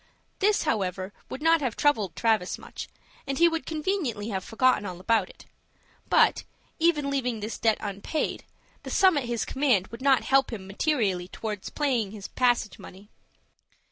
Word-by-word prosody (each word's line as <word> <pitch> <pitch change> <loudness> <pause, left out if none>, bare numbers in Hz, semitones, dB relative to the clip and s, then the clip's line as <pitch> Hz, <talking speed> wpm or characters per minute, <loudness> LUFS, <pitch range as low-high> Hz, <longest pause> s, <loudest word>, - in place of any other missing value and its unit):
This, 415 +1 +3
however, 190 - -2 0.2
would 280 - -6
not 325 0 +4
have 255 -6 -1
troubled 215 - +1
Travis 220 -5 +1
much, - - -8 0.4
and 275 0 -2
he 340 - +6
would 330 -1 -2
conveniently 305 - -2
have 190 -3 -3
forgotten 255 +1 +2
all 180 -3 -6
about 205 0 +1
it; - - -16 0.6
but, - - +4 0.4
even 305 -4 +2
leaving 250 -5 -1
this 215 +2 -5
debt 220 -2 +3
unpaid, 205 +9 -3 0.4
the - - -8
sum 375 -3 +4
at 285 -4 0
his 235 -1 -2
command 250 -9 +1
would 230 +4 -10
not 270 -1 +4
help 270 -1 +3
him 205 -5 -6
materially 195 - 0
towards 210 0 -5
paying 255 -8 0
his 205 -1 -8
passage 245 -4 +1
money. 200 +3 -13
235 Hz, 165 wpm, -27 LUFS, 205-290 Hz, 0.6 s, he